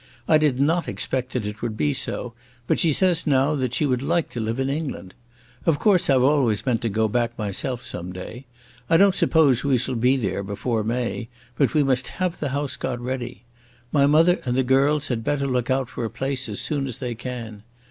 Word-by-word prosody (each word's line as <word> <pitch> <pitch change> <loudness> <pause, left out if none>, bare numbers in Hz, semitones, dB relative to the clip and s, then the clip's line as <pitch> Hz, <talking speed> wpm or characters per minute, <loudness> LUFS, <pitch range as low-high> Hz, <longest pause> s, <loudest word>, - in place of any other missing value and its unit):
I 155 - +5
did 145 -4 +1
not 165 +5 +2
expect 130 -1 -3
that 125 -5 -2
it 105 0 -6
would 115 -2 -3
be 75 -5 +1
so, 120 -2 -3 0.3
but - - +1
she 165 - +4
says 180 +2 +2
now 140 +1 +3
that 130 -5 -1
she 150 - +1
would 125 -3 0
like 165 +3 0
to 120 - -5
live 115 +3 -2
in 135 - 0
England. 140 - -4 0.5
Of 165 -4 +2
course 190 -4 +3
I've 130 -2 +4
always 130 -6 +2
meant 120 -4 +1
to 115 - -1
go 110 +2 +1
back 120 +2 -1
myself 110 +4 -3
some 90 +1 -6
day. 110 +8 -9 0.4
I 165 - +5
don't 195 +1 +5
suppose 145 -9 +3
we 140 -3 +3
shall 125 +2 -2
be 125 +3 +2
there 100 -5 -2
before 105 +3 -2
May, 115 +1 -2 0.3
but 140 +3 +1
we 150 - +4
must 130 -2 +1
have 185 -2 -1
the 145 - -2
house 140 +1 -2
got 125 -2 -3
ready. 120 -3 -5 0.5
My 140 -1 +4
mother 165 +5 +4
and 125 -1 -1
the 130 - +3
girls 140 +3 +2
had 115 -3 -2
better 140 +3 0
look 125 -2 -1
out 130 -1 +1
for 120 - -6
a 115 - -2
place 135 0 -3
as 105 - -3
soon 140 -3 -1
as 125 - -4
they 125 -2 -4
can. 115 -3 -7
130 Hz, 220 wpm, -23 LUFS, 115-145 Hz, 0.5 s, I